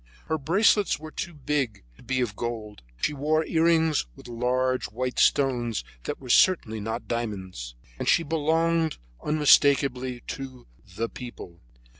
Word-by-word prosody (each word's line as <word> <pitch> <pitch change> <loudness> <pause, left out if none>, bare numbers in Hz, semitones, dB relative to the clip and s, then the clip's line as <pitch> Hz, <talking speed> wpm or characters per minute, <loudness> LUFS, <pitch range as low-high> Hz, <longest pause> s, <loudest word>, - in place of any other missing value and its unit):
Her 160 - -1
bracelets 195 +6 +3
were 155 +1 -9
too 175 0 -5
big 135 - -2
to - - -19
be 130 -1 -1
of 110 -5 -2
gold; 110 -3 -5 0.2
she 150 - 0
wore 155 +3 +1
earrings 160 - +2
with - - -13
large 125 +2 0
white 125 +4 -3
stones 120 -6 +2 0.2
that - - -4
were 130 - -11
certainly 115 -13 +4
not 110 +2 -4
diamonds, 95 - -4 0.2
and - - 0
she 170 - +4
belonged 160 +1 +1 0.3
unmistakably 140 -4 +3
to 130 -2 -7 0.3
the 115 +3 -1
People. 115 -9 -10
130 Hz, 140 wpm, -26 LUFS, 120-155 Hz, 0.3 s, certainly